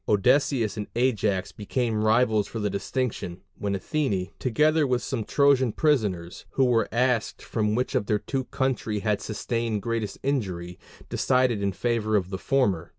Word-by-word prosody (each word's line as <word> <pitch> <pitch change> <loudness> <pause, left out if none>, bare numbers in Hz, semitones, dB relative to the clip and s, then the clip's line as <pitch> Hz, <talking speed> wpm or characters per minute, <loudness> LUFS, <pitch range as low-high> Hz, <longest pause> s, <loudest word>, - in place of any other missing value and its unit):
Odysseus 115 +1 +2
and 105 - -4
Ajax 110 -6 +1
became 110 +1 -1
rivals 110 -2 +3
for - - -7
the 105 -2 -1
distinction, 100 -3 -3 0.2
when 100 -1 -1
Athene, 100 - -1
together 150 +4 +2
with 125 -1 0
some 115 - -2
Trojan 135 -1 +3
prisoners, 105 - 0
who 135 - +3
were 120 -2 +2
asked 120 -1 0
from 105 -2 0
which 125 +2 -1
of 105 - 0
the 105 - +2
two 110 +6 -3
their - - -2
country 125 -6 -1
had 105 -1 0
sustained 115 -1 -2
greatest 115 -4 -2
injury, 95 -11 -2 0.3
decided 125 -5 +1
in 100 0 +1
favor 110 0 0
of 95 -2 0
the 95 - -3
former. 100 -12 +1
110 Hz, 160 wpm, -26 LUFS, 100-130 Hz, 0.3 s, rivals